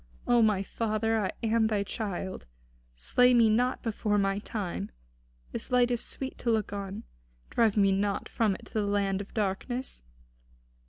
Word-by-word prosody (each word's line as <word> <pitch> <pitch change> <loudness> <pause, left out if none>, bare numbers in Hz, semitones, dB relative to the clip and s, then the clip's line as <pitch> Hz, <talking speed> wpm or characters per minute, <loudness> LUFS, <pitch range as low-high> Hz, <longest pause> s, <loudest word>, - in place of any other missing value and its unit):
O 240 -1 +4
my 210 -3 +3
father, 220 +1 0
I 190 - -1
am 225 0 +3
thy 210 -2 0
child; 195 - -5 0.5
slay 250 - +4
me 230 -2 +5
not 245 +4 +1
before 210 -2 0
my 195 0 +1
time. 190 - -4 0.6
This - - -5
light 245 -1 +3
is 240 - 0
sweet 265 -1 -5
to 240 - -1
look 220 -3 +1
upon. 200 +1 -5 0.5
Drive 225 -3 +2
me 195 -1 +5
not 200 +1 0
from 215 -4 +1
it - - -12
to - - -18
the 215 - +1
land 200 -1 0
of 205 - -11
darkness. 220 - -2
215 Hz, 165 wpm, -29 LUFS, 195-230 Hz, 0.6 s, me